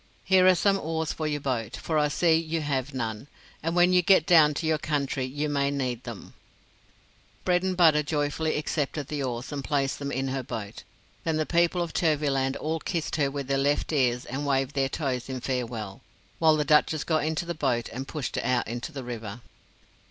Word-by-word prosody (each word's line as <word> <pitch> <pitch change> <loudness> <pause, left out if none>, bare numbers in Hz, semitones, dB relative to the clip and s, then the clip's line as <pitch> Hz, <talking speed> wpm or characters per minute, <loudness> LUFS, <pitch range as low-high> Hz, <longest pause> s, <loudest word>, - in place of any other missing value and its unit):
Here 185 -1 +5
are 185 - +7
some 195 +3 +2
oars 160 -1 -2
for 155 - -3
your 150 -1 -2
boat, 120 -6 -2
for 155 -2 -1
I 150 - +3
see 165 +3 +2
you 165 0 -1
have 140 -2 -2
none, 115 -2 -4 0.3
and 165 +2 -2
when 180 +1 +5
you 180 - +6
get 180 -3 +5
down 155 -4 +6
to 160 - -3
your 155 -1 +1
country 140 -3 -1
you 145 +4 -3
may 140 -1 +1
need 130 -3 -3
them." 115 -4 -8 1.1
Bredenbutta 180 -4 +4
joyfully 150 +1 -1
accepted 150 -1 -2
the 150 -2 -3
oars, 125 0 -4
and 140 -2 -4
placed 140 -1 0
them 140 0 -4
in 135 0 -1
her 135 0 -2
boat. 110 -6 -6 0.4
Then 160 -1 0
the 155 - 0
people 175 +1 +2
of 170 - -6
Turvyland 140 -5 +1
all 160 +2 -2
kissed 165 -1 -2
her 140 -3 +2
with 140 0 -4
their 135 +1 0
left 145 +3 +1
ears 125 -4 +1
and 135 +3 -4
waved 135 -1 0
their 135 -1 +1
toes 130 -4 -3
in 130 -1 -3
farewell, 115 -6 -4 0.4
while 160 -1 +5
the 150 - 0
Duchess 150 +1 +3
got 155 -2 +1
into 160 +2 -1
the 170 - -3
boat 130 -7 0
and 130 +3 -6
pushed 150 -4 -4
it - - -1
out 125 -1 +1
into 120 +6 -5
the 135 -4 -6
river. 115 -2 -6
145 Hz, 205 wpm, -27 LUFS, 130-160 Hz, 1.1 s, are